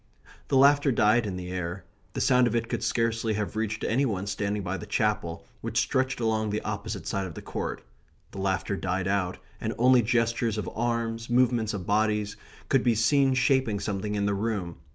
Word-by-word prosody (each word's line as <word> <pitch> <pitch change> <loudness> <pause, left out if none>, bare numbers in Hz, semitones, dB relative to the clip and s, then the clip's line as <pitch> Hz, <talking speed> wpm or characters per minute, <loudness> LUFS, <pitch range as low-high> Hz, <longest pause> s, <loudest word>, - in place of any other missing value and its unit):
The 135 - +2
laughter 140 +1 +5
died 110 0 +3
in 95 - -3
the 90 0 -6
air. 90 0 -4 0.3
The - - -2
sound 125 -1 +4
of 120 - -1
it 115 0 0
could - - -2
scarcely 115 -1 0
have 105 0 -3
reached 110 0 -2
any 130 +5 +1
one 100 -7 -1
standing 100 +1 -2
by 95 +1 -2
the 105 - -8
Chapel, 105 -5 -1 0.2
which - - -1
stretched 130 -1 0
along 110 -2 0
the 105 +1 -1
opposite 100 -3 -4
side 95 +3 -2
of 85 - -10
the - - -7
court. - - -4 0.5
The 100 - -8
laughter 95 +1 -1
died 95 0 -2
out, 95 -2 0 0.2
and - - -3
only 125 +1 +5
gestures 115 -1 +1
of 105 -4 -3
arms, 115 0 -2
movements 120 -3 +2
of 95 -3 -5
bodies, 105 0 +1 0.3
could 135 - +3
be 120 -2 +2
seen 135 +4 +3
shaping 130 -5 +2
something 105 +1 -3
in 100 -1 0
the 100 - +1
room. 100 -5 -2
110 Hz, 195 wpm, -27 LUFS, 100-120 Hz, 0.5 s, laughter